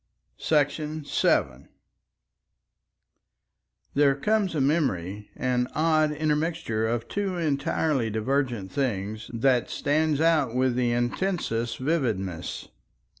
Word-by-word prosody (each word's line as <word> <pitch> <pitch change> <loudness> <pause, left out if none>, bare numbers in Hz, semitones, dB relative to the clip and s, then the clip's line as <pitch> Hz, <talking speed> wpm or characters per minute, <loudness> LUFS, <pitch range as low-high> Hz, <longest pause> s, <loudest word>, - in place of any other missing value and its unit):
§ 150 0 0
7 70 +3 +1 2.2
There 140 -1 +4
comes 200 +4 0
a - - +1
memory, 105 - 0
an 125 -1 0
odd 155 -1 +3
intermixture 150 -6 -1
of 115 0 -2
two 195 -3 -2
entirely 140 -4 0
divergent 115 -2 -1
things, 110 -6 -2
that 120 0 +2
stands 155 0 +1
out 155 -7 +2
with 130 0 +2
the 125 -1 +1
intensest 120 -2 -1
vividness. 110 - -2
135 Hz, 95 wpm, -26 LUFS, 115-155 Hz, 2.2 s, There